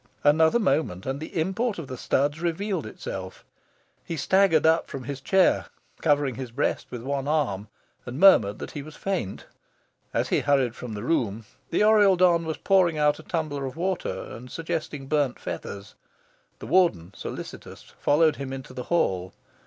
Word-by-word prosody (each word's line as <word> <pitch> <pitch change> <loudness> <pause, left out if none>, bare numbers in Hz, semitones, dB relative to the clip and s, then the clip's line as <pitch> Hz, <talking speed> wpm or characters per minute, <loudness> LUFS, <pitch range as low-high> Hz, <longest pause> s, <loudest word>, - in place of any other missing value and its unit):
Another 160 +6 +5
moment, 155 - 0
and 135 +1 -2
the 160 +2 -4
import 200 +7 -1
of 165 - -5
the 130 - -6
studs 145 +5 0
revealed 175 - -2
itself. 95 -3 -7 0.6
He 165 - -5
staggered 190 0 +3
up 160 +1 +4
from 135 - -6
his 135 +1 -6
chair, 190 +6 +3 0.3
covering 145 -4 +2
his 125 +1 -6
breast 125 +5 -1
with 120 -2 -7
one 140 +1 -2
arm, 125 -10 0 0.4
and 125 +4 -5
murmured 110 - +6
that - - -7
he 145 - -5
was 155 +2 -11
faint. 180 - -3 0.7
As - - -1
he - - +2
hurried 135 -5 +2
from 125 -4 -7
the 105 - -5
room, 115 -6 0 0.2
the - - +2
Oriel 210 -3 +6
don 175 -2 +4
was 160 -1 -3
pouring 185 -5 +3
out 150 0 +2
a - - -8
tumbler 155 -4 -3
of 130 - -8
water 185 +2 -2
and 125 +2 -10
suggesting 160 -2 -4
burnt 145 -3 0
feathers. 100 0 -7 0.6
The - - -9
Warden, 130 - +2
solicitous, - - -8 0.2
followed 155 +1 +3
him 135 -1 -5
into 135 0 -7
the 125 - -6
hall. 95 - 0
145 Hz, 170 wpm, -26 LUFS, 125-170 Hz, 0.7 s, murmured